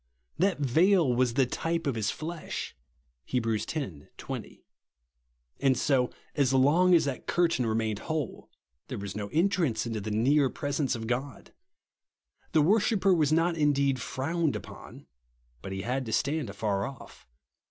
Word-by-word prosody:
Ttat 190 +1 +2
veil 160 +2 +3
was 120 -1 +1
the 135 -1 +4
type 165 +6 -2
of 140 - +1
his 110 -3 -1
flesh 165 +1 -5 0.5
(Heb. 125 -3 -1
x. 110 -1 -1 0.5
20); - - -7 0.9
and, 130 -2 +3
so 130 -3 +2 0.3
long 145 +6 +4
as 165 - +4
that 140 -2 -4
curtain 165 -8 +1
remained 110 -1 -1
Avhole, 155 -6 -4 0.4
there 130 - -5
was 100 -1 -6
no 105 -1 -3
entrance 160 - +1
into 115 -2 -3
the 110 - -4
near 130 +6 +3
presence 145 -2 -1
of 115 -1 -5
God. 125 +4 -4 1.0
The 155 -3 +5
worshipper 200 +1 +3
was 155 -4 +2
not 165 +2 +2
indeed 140 -4 +2
frowned 160 +3 -1
upon; - - -10 0.6
but 95 - -7
he 95 0 -4
had 125 +2 -2
to 110 - -3
stand 145 0 0
afar 100 -1 -1
off. 135 - -12
135 Hz, 145 wpm, -28 LUFS, 115-160 Hz, 1.0 s, The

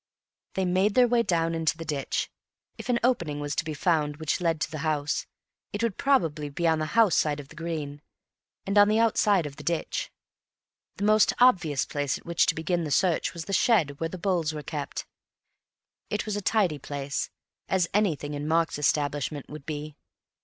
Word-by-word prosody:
They 190 - +1
made 185 +3 +2
their 250 -1 +6
way 240 0 +3
down 165 -6 +1
into 165 -1 0
the 165 - -7
ditch. 145 -3 -2 0.4
If - - -9
an 245 - +3
opening 170 -13 +1
was 145 0 -3
to - - 0
be 155 -2 -5
found 150 -2 +1
which 155 +2 -1
led 165 -2 +1
to - - -1
the 155 - -5
house, 150 -1 -1 0.5
it 205 +2 -2
would 230 -5 0
probably 165 - +1
be 170 +4 -1
on 160 -1 +3
the 155 - -1
house 220 -7 +6
side 150 -1 +1
of 140 -1 -10
the - - -14
green, 155 -3 -5 0.6
and 200 +1 +3
on 205 - +7
the 215 +1 +2
outside 210 -5 +3
of 140 -1 -7
the - - -9
ditch. 170 -1 -2 0.8
The - - -5
most 215 +1 +4
obvious 180 - +4
place 145 -2 -2
at - - -17
which 170 -1 +2
to - - +2
begin 170 +2 -1
the 155 - -3
search 175 +3 +1
was 165 -1 -5
the 195 - -5
shed 180 - +3
where 165 - -1
the 185 - -7
bowls 170 -4 0
were 150 - -5
kept. 145 0 -5 1.0
It 210 - -2
was 215 -2 -2
a 205 - -2
tidy 185 -7 +1
place—as 145 +6 -3
anything 165 -8 0
in 145 +1 -4
Mark's 165 -1 +1
establishment 145 0 -1
would 150 -2 -9
be. 150 -1 -5
165 Hz, 195 wpm, -27 LUFS, 150-190 Hz, 1.0 s, on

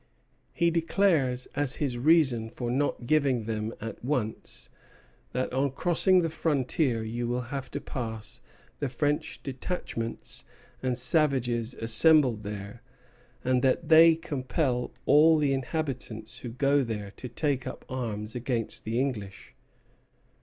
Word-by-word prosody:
He 170 0 +2
declares 165 -7 +2
as 145 -2 0
his 140 -5 -2
reason 135 -6 +3
for 120 +1 -4
not 135 -1 -1
giving 135 -4 +2
them 110 0 -3
at 115 +1 -7
once, 125 -5 -3 0.6
that 130 0 -2
on 135 +2 +2
crossing 180 +4 +3
the 165 - 0
frontier 140 -6 0
"you 120 +2 -3
will 120 +1 -1
have 135 -2 -4
to - - -4
pass 110 -4 -5 0.4
the 145 - -1
French 145 +4 -2
detachments 130 -4 -5 0.4
and 130 -2 -1
savages 125 -5 +1
assembled 120 +1 +4
there, 105 +2 -7 0.6
and 130 0 +2
that 130 +5 +1
they 165 +1 +8
compel 130 -4 -2
all 155 +2 +6
the 145 -2 +2
inhabitants 130 -5 -4
who 125 - -6
go 140 +4 +2
there 105 -4 -4
to 125 - -7
take 135 0 -1
up - - -7
arms" 110 -4 -4
against 120 -2 -3
the 115 +2 -1
English. 110 -8 -4
130 Hz, 130 wpm, -28 LUFS, 115-145 Hz, 0.6 s, they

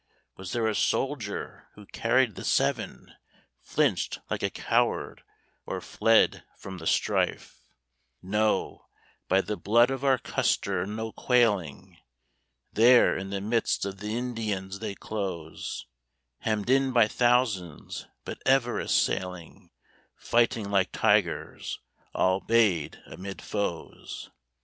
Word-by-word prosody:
Was 95 -1 -8
there 115 -2 0
a 110 - +1
soldier 125 -3 -2
who 105 - -13
carried 115 +2 +1
the - - -8
Seven - - -1 0.5
Flinched - - 0
like - - -1
a - - +1
coward - - 0 0.5
or - - -3
fled 115 0 +2
from 95 -1 -8
the 80 - -5
strife? - - 0 0.6
No, 105 +3 -1 0.4
by 95 - +3
the 105 +1 -4
blood 120 +5 +4
of 135 0 -4
our 135 -2 +4
Custer, 95 -5 0
no 110 +2 -4
quailing! 105 - 0 0.7
There 120 +3 +6
in 95 0 -4
the 100 0 -3
midst 110 -1 0
of 100 -1 -6
the 105 +2 -3
Indians 105 -6 -3
they 105 -3 -4
close, 95 -8 -5 0.5
Hemmed 110 +1 -1
in 135 -1 +3
by 115 -3 +5
thousands, 115 - 0 0.2
but - - -7
ever 135 -3 +2
assailing, 90 -2 -1 0.5
Fighting 115 -3 +1
like 95 -2 +2
tigers, - - 0 0.4
all 95 +1 +2
'bayed 100 -7 +2
amid 95 +1 -8
foes! 100 -6 -5
105 Hz, 120 wpm, -27 LUFS, 95-120 Hz, 0.7 s, There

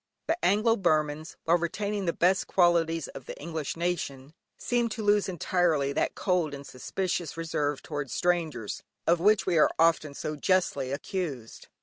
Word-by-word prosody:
The 330 +2 -1
Anglo 215 +4 +3
Burmans, 155 -3 0
while 170 +2 +3
retaining 200 +4 -2
the 170 - +2
best 185 +3 +2
qualities 165 -3 +2
of 130 - -10
the - - -7
English 160 -1 -4
nation, 155 -5 -3 0.2
seem 240 -1 0
to 220 0 -5
lose 205 -1 +3
entirely 165 -5 +1
that - - 0
cold 175 -6 0
and 140 0 -10
suspicious 175 +6 -3
reserve 150 -3 -2
towards 145 -4 -5
strangers, 165 -11 -1 0.2
of 170 0 +3
which 210 +4 +4
we 175 -4 +2
are - - +6
often 160 -3 +2
so 155 - -4
justly 145 -5 +1
accused. 140 - -5
165 Hz, 155 wpm, -28 LUFS, 150-185 Hz, 0.2 s, are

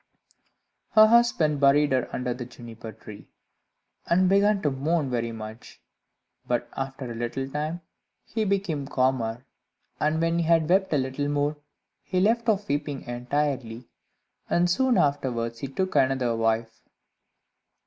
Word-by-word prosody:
Her 215 -1 +8
husband 215 -11 +3
buried 145 +1 +4
her 130 -2 +1
under 125 -1 -2
the 125 +1 -6
Juniper 115 -2 -10
tree, 105 -1 -12 0.8
and 185 +2 +3
began 200 +2 +3
to 145 - +2
mourn 140 +1 -1
very 115 -1 -1
much; 110 +1 -9 0.7
but - - 0
after 135 -2 -5
a - - -6
little 120 +3 -3
time, 150 +5 -3 0.4
he 220 0 -2
became 190 -8 -1
calmer, 130 -3 0 0.5
and 155 +1 +1
when 165 +1 +1
he 170 - 0
had 165 -1 +3
wept 190 +3 +2
a 150 - +3
little 130 +2 -2
more, 145 +1 0 0.5
he 185 - -2
left 230 +4 +2
off 205 -1 +1
weeping 145 -2 -2
entirely, 125 -1 -3 0.6
and 175 0 +2
soon 260 +5 +2
afterwards 120 -5 0
he 140 - -4
took 185 +8 -3
another 130 -3 +2
wife. 115 0 -1
140 Hz, 140 wpm, -26 LUFS, 120-170 Hz, 0.8 s, Her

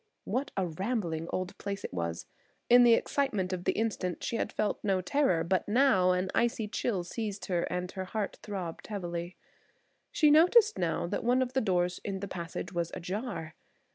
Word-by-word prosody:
What 270 +3 -2
a 190 - +2
rambling 170 -2 -2
old 185 0 -3
place 200 0 -4
it - - -6
was. 85 -1 -3 0.5
In 245 0 +9
the 235 -1 +7
excitement 210 -12 0
of 180 -1 -4
the - - +2
instant 200 -5 -2
she - - -2
had - - -1
felt 210 - -1
no 195 -2 +2
terror, 185 - +2
but 185 +2 0
now 210 -5 +4
an 185 +1 +1
icy 235 -2 +1
chill 205 -3 -1
seized 205 +2 -4
her 175 -2 0
and 180 0 -2
her 190 -1 -5
heart 205 +2 -3
throbbed 185 -5 -6
heavily. 175 -3 -4 0.8
She 300 -2 +4
noticed 360 - +6
now 170 -2 0
that 170 - -3
one 250 +2 +3
of 255 0 -6
the 265 - +2
doors 180 -3 +1
in 195 -1 -3
the 200 - -4
passage 175 -1 -5
was 170 -1 -1
ajar! 180 -3 -4
190 Hz, 185 wpm, -30 LUFS, 175-230 Hz, 0.8 s, In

